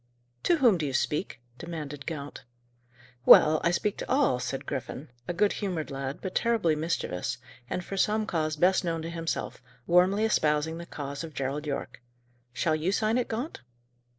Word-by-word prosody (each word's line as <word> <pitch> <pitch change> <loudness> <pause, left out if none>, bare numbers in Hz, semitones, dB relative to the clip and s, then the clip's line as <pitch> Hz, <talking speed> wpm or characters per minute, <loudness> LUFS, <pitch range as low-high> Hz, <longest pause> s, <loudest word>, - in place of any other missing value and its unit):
"To 345 - +4
whom 235 - +4
do 155 - -1
you 135 - -4
speak?" 150 -2 -1 0.2
demanded 150 -4 -6
Gaunt. 145 -3 -6 0.8
"Well, 155 +4 +8
I 170 - +4
speak 200 +4 0
to - - -6
all," 260 - +3
said 125 +2 -4
Griffin, 130 0 -5 0.2
a - - -1
good 205 +2 +3
humoured 165 -8 -2
lad, 135 0 -4
but 185 - -4
terribly 220 -9 +2
mischievous, 125 - -2 0.3
and, 180 - -3
for 195 - -5
some 215 +2 +2
cause 155 -5 -1
best 180 +5 +3
known 165 -2 -2
to 165 - -5
himself, 165 -4 -3 0.2
warmly 185 +5 +4
espousing 155 -5 +1
the 170 - -8
cause 140 -1 -5
of 160 -2 -8
Gerald 140 +3 -3
Yorke. 140 -3 -4 0.5
"Shall 155 +5 +1
you 160 +4 0
sign 220 +3 +2
it, 245 - -1
Gaunt?" 240 +8 -4
165 Hz, 175 wpm, -28 LUFS, 145-195 Hz, 0.8 s, Well